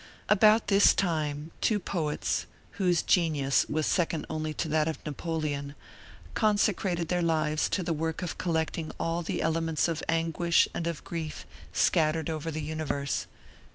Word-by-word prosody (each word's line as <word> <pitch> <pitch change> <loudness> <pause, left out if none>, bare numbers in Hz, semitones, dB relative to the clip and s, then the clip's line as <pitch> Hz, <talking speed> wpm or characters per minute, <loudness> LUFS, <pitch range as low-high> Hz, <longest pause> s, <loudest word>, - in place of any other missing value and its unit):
About 215 +2 +5
this 200 0 +5
time 155 -4 -1
two 215 - +3
poets, 160 -6 -2 0.3
whose 180 -3 +3
genius 150 -6 +2
was 155 0 0
second 165 -3 0
only 155 0 -2
to - - -2
that 155 0 +1
of 160 - -2
Napoleon, 150 -2 -3 0.6
consecrated 200 -5 +1
their 180 -1 +1
lives 155 -2 +1
to 185 - -1
the 165 - -1
work 160 +3 -2
of 175 - -5
collecting 160 -2 -1
all 165 +1 -1
the 170 - -2
elements 165 -1 +1
of 165 -2 -2
anguish 165 +1 +2
and 170 - -3
of 170 -3 -4
grief 160 -2 -5 0.3
scattered 160 -1 +2
over 155 0 -3
the 155 -1 -4
universe. 145 -2 -2
165 Hz, 150 wpm, -28 LUFS, 155-170 Hz, 0.6 s, About